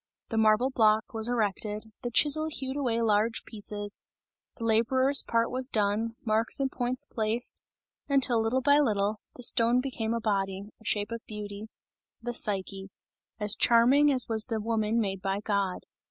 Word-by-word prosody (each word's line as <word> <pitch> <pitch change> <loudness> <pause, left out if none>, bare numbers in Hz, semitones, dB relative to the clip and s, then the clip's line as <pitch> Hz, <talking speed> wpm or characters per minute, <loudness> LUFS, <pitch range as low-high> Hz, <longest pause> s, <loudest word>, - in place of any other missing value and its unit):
The 225 - -3
marble 220 +4 +3
block 220 -2 +2
was 220 0 0
erected, 215 -2 -2 0.2
the 240 - -3
chisel 300 +5 +4
hewed 270 -4 -5
away 235 -5 -1
large 220 +1 +1
pieces; 205 -1 -6 0.6
the 230 - -7
labourer's 260 +5 +3
part 230 0 0
was 255 +1 +2
done, 215 +1 -1
marks 220 +3 +1
and 270 -1 -1
points 255 +3 -1
placed, 225 -1 -3 0.5
until 260 -4 +3
little 230 +4 0
by 285 +2 +4
little, 210 -5 0 0.2
the 250 - -10
stone 235 +1 +4
became 235 -4 -3
a - - -1
body, 195 -3 -2 0.2
a - - -19
shape 205 +1 -2
of 230 0 -5
beauty 210 0 -8 0.5
the 240 +1 -5
Psyche 195 -3 -1 0.5
as 210 0 +4
charming 260 +5 +4
as 255 -3 +3
was 220 -2 +2
the 225 -3 -2
woman 220 0 -1
made 195 -3 -2
by 195 +1 -2
God. 200 -3 -2
225 Hz, 165 wpm, -28 LUFS, 210-250 Hz, 0.6 s, chisel